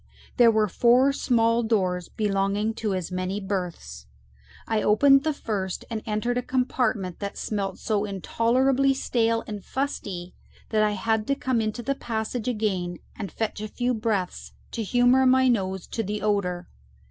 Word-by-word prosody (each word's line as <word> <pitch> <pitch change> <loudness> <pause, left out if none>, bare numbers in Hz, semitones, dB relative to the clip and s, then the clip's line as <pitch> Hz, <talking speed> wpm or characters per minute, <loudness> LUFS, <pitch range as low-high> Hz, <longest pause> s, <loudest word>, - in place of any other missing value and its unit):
There 240 -2 +7
were 215 -1 +3
four 245 +7 +4
small 230 -3 +2
doors, 185 -6 0
belonging 205 +1 0
to 215 -3 -2
as 185 -1 -4
many 185 +2 -2
berths; 175 - -5 0.6
I 220 -1 +1
opened 275 +6 +5
the 315 - +1
first, 200 -9 -4
and 220 -1 -2
entered 235 +3 0
a - - -2
compartment 245 -7 -1
that 200 -1 -5
smelt 200 -3 -3
so 210 -2 -1
intolerably 255 +7 +2
stale 230 -3 +1
and 210 -3 -6
fusty 195 -10 -4 0.4
that 215 -1 +2
I 210 -1 +2
had 220 +2 0
to 275 - +2
come 260 -4 0
into 220 +2 -3
the 275 - 0
passage 225 -2 -4
again 195 -7 -1 0.2
and 200 -3 -6
fetch 220 -2 -3
a 215 - -3
few 245 +3 -1
breaths 215 -5 -2 0.2
to 230 - -3
humour 245 +4 +4
my 260 0 +5
nose 190 -6 0
to 225 - -2
the 210 0 -4
odour. 195 -4 0
215 Hz, 160 wpm, -25 LUFS, 195-245 Hz, 0.6 s, There